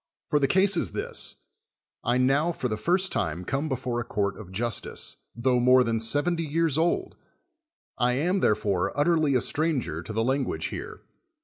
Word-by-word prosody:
For 150 - +4
the 140 - +2
case 190 +5 +3
is 110 - -1
this: - - -2 0.7
I 120 +1 +2
now 140 +6 +3
for 130 - -2
the 110 - -2
first 180 - +1
time 85 +3 -2
come 140 - -2
before 125 -2 -2
a - - -2
court 100 -3 -1
of 95 -4 -11
justice, 115 +3 -3 0.2
tho 125 +1 +2
more 125 +1 +6
than 115 -1 0
seventy 145 +10 +1
years 160 -1 +1
old; 165 +2 0 0.8
I 125 0 +3
am, 175 +9 +1
therefore, 100 - +1
utterly 155 -3 +3
a 125 - +3
stranger 145 - -1
to 110 - -8
the 110 +1 0
language 135 +2 -1
here. - - -7
130 Hz, 175 wpm, -26 LUFS, 115-155 Hz, 0.8 s, more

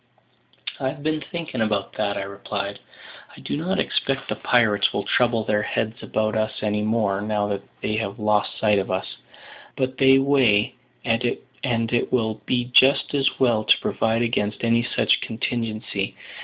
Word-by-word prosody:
"I've 140 +2 -3
been 155 0 0
thinking 165 -9 -4
about 105 -3 -1
that," 100 -1 -1
I - - -2
replied. 100 0 -5 0.6
"I - - -11
do - - -4
not 175 +6 -1
expect 135 0 -1
the - - -1
pirates 110 -4 +2
will 100 - -2
trouble 120 -2 +2
their 105 0 +1
heads 110 +3 -2
about 110 0 -1
us 110 0 -2
any 105 0 0
more, 105 -2 0
now 105 -1 -1
that 100 -1 -2 0.2
they 105 - 0
have 100 -3 -3
lost 105 -1 0
sight 105 -2 +3
of 95 - -3
us; 95 0 -3 0.6
but 130 -1 -2
they 135 -1 +6
way, 130 -6 +3 0.3
and 115 0 +1
it 120 -2 -1
will 110 -4 0
be 120 -1 +1
just 135 +4 +5
as 135 -2 +1
well 120 -4 +3
to - - +5
provide 115 +1 0
against 105 -3 -1
any 115 0 +3
such 125 - +1
contingency. 110 -3 -3
110 Hz, 165 wpm, -23 LUFS, 105-125 Hz, 0.6 s, they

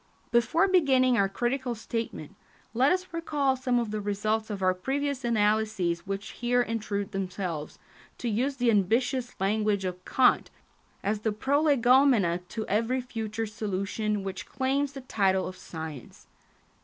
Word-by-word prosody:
Before 240 +11 +3
beginning 265 -9 +4
our 195 -4 +2
critical 245 +3 -1
statement, 225 -7 -5 0.4
let 255 +5 +4
us 370 0 +1
recall 295 -5 0
some 255 -1 0
of 235 -3 -1
the 215 0 -2
results 215 +2 -1
of 200 -3 -4
our 185 0 +4
previous 270 +7 -2
analyses 210 -6 +1
which 195 +1 -4
here 245 0 +1
intrude 215 -3 -3
themselves, 185 -5 -4 0.4
to 245 - -4
use 250 +6 0
the 245 -2 +2
ambitious 245 +5 +1
language 205 0 +1
of 180 0 -4
Kant, 260 +5 +3 0.5
as 205 +1 0
the 220 +1 0
prolegomena 255 - +3
to 220 -1 -4
every 230 +5 +1
future 225 -3 -4
solution 210 0 -2
which 195 -1 -5
claims 275 +1 -1
the 270 - -7
title 195 -6 +1
of 185 - -7
science. 160 -6 -9
220 Hz, 145 wpm, -28 LUFS, 200-255 Hz, 0.5 s, beginning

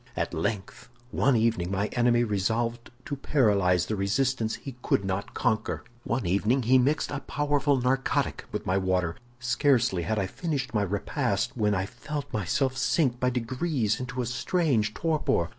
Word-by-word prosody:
"At - - -2
length, 100 +6 -3 0.2
one 140 -1 +3
evening 110 -6 +1
my 100 +1 0
enemy 120 -1 +3
resolved 115 +3 -1 0.2
to 145 - -3
paralyze 100 - +2
the 110 - -2
resistance 110 +3 0
he 135 -3 -8
could 100 - +1
not 95 +1 -3
conquer. 110 - 0 0.2
One 120 -2 -1
evening 105 +9 +2
he 130 +3 +5
mixed 145 +5 +1
a 145 - -2
powerful 145 -1 +1
narcotic 130 +2 0
with - - -4
my 95 +2 +2
water. 90 -3 0 0.2
Scarcely 120 -5 +2
had 110 +6 -1
I 100 - +1
finished 135 - -3
my 105 - +2
repast, 100 0 -1
when 105 -1 +1
I 95 0 0
felt 145 +7 -6
myself 130 - 0
sink 130 -1 +1
by 125 - +2
degrees 125 -1 -1
into 125 0 -3
a - - -3
strange 125 - 0
torpor. 155 - +1
120 Hz, 160 wpm, -27 LUFS, 100-130 Hz, 0.2 s, he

